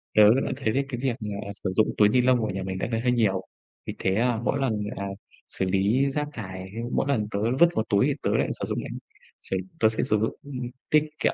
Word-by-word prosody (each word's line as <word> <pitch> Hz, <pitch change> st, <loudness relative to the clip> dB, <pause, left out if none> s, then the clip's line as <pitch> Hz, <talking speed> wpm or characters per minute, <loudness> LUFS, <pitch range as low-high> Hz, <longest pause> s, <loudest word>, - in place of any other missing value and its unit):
Tớ 105 Hz, -, +8 dB, 0.2 s
đã -, -, -2 dB
thấy 120 Hz, -6 st, 0 dB
được 140 Hz, -, +2 dB
cái 120 Hz, -3 st, -4 dB
việc 130 Hz, -3 st, 0 dB
là 100 Hz, -2 st, -5 dB
sử 95 Hz, -, 0 dB
dụng 105 Hz, +4 st, +3 dB
túi 105 Hz, -1 st, +6 dB
ni 125 Hz, +3 st, +4 dB
lông 125 Hz, -1 st, +4 dB
của 110 Hz, -, -1 dB
nhà 95 Hz, +1 st, -3 dB
mình 95 Hz, 0 st, -4 dB
đợt -, -, -2 dB
này 115 Hz, -1 st, -1 dB
hơi 125 Hz, 0 st, +2 dB
nhiều. 105 Hz, -6 st, +2 dB, 0.4 s
Vì -, -, -4 dB
thế, 95 Hz, 0 st, +1 dB
à, 120 Hz, 0 st, +2 dB
mỗi 140 Hz, -, 0 dB
lần, 130 Hz, -5 st, +1 dB, 0.2 s
à, 100 Hz, -, -3 dB, 0.4 s
xử 95 Hz, -, -2 dB
lý 100 Hz, +8 st, +2 dB
rác 150 Hz, +1 st, -2 dB
thải, 95 Hz, -4 st, -7 dB, 0.2 s
mỗi -, -, +1 dB
lần 110 Hz, -6 st, +1 dB
tớ 100 Hz, -, -1 dB, 0.2 s
vứt 170 Hz, -, +7 dB
vào 110 Hz, -, +1 dB
túi 100 Hz, -1 st, +4 dB
thì -, -, +2 dB
tớ -, -, +1 dB
lại -, -, +1 dB
sử -, -, -2 dB
dụng -, -, -2 dB
lại -, -, -7 dB, 0.5 s
sẽ 95 Hz, -, -2 dB, 0.2 s
tớ 110 Hz, -, +5 dB
sẽ 110 Hz, -, -1 dB
sử 105 Hz, -, +2 dB
dụng, 110 Hz, -, -1 dB
ừ, 145 Hz, -, -10 dB, 0.4 s
tiết 155 Hz, 0 st, +5 dB, 0.2 s
kiệm -, -, +2 dB
110 Hz, 260 wpm, -26 LUFS, 100-125 Hz, 0.5 s, Tớ